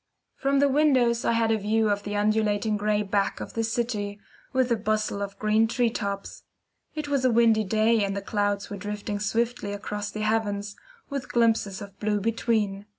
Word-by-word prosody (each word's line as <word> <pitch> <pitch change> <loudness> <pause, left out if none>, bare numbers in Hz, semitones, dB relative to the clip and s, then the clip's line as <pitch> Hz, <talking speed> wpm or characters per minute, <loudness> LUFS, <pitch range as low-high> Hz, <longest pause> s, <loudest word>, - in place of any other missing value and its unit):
From 275 +1 +1
the 285 +1 +5
windows 260 -5 +3
I - - +3
had 230 -1 +2
a 220 - +2
view 215 +1 +1
of 205 0 0
the 205 0 -5
undulating 210 0 +1
gray 210 0 +1
back 200 0 0
of - - -7
the 225 - -1
city, 220 -3 -2 0.3
with 260 -2 +1
the 235 - +3
bustle 215 -1 -1
of 200 0 -5
green 215 +2 +3
tree 235 0 +1
tops. 200 -3 -4 0.5
It 305 -1 -3
was 280 -2 0
a 255 - +4
windy 230 -2 +4
day, 220 +2 +2
and 200 0 -2
the - - -2
clouds 205 -1 -1
were 205 - -4
drifting 205 +1 -4
swiftly 225 0 -1
across 205 0 -4
the 215 +1 -5
heavens, 210 -2 -1 0.4
with 275 -2 -4
glimpses 225 -4 +1
of 200 -1 -13
blue 210 -1 0
between. 210 -2 -1
215 Hz, 190 wpm, -26 LUFS, 205-230 Hz, 0.5 s, the